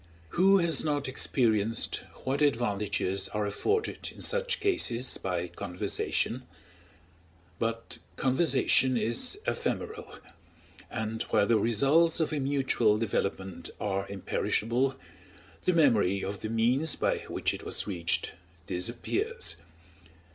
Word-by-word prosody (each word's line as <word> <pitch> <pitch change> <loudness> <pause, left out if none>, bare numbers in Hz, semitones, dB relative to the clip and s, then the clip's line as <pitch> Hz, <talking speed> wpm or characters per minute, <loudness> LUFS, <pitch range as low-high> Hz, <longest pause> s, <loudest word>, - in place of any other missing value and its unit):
Who 195 - +5
has 170 -6 +2
not 145 -3 -1
experienced 115 -4 0 0.2
what 135 +3 -1
advantages 105 -7 0
are 105 -1 -1
afforded 425 - -1
in - - -10
such 485 -1 +1
cases 130 - +1
by 90 -2 -2
conversation? 90 +7 -2 1.2
But 115 0 -3 0.2
conversation 130 -2 +3
is 120 - 0
ephemeral; 440 +1 -3 0.7
and 110 -1 -3
while 100 - +3
the 110 +1 +3
results 140 +10 +3
of 160 -1 0
a 150 - 0
mutual 135 -6 +2
development 100 -3 -2
are 100 -1 -2
imperishable, 115 +6 0 0.7
the 185 - +3
memory 110 - +3
of 100 0 -4
the 110 - -3
means 125 +7 +2
by - - 0
which - - -1
it - - -6
was - - -1
reached 85 -5 -1 0.3
disappears. 85 -1 -1
115 Hz, 110 wpm, -29 LUFS, 100-145 Hz, 1.2 s, Who